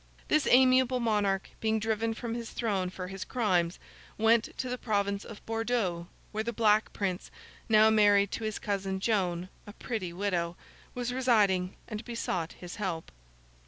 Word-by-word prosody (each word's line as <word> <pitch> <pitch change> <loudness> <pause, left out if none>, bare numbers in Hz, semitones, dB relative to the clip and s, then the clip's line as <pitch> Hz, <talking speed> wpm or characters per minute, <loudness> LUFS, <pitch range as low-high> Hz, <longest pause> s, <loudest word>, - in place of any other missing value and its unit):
This 305 -1 +3
amiable 255 0 +5
monarch 205 -4 0
being 220 0 +1
driven 225 +1 -1
from 230 -1 -4
his 235 -1 -5
throne 195 -6 -1
for 185 0 -6
his 195 +1 -6
crimes, 185 -8 0 0.4
went 225 +1 +3
to 260 - -3
the 250 0 -3
province 200 -2 0
of 215 - -11
Bordeaux, 225 -7 -1 0.2
where 215 0 -2
the 235 - -2
Black 215 -1 +3
Prince—now 215 +3 +1
married 205 -2 +4
to 230 - -4
his 215 -1 -2
cousin 195 -2 -2
Joan, 185 -4 0 0.2
a 205 - -9
pretty 215 -6 -4
widow—was 185 +6 -4
residing, 205 -8 +2
and 215 +1 -5
besought 185 -8 -3
his 180 -1 -9
help. 185 -6 -3
210 Hz, 150 wpm, -30 LUFS, 190-230 Hz, 0.4 s, amiable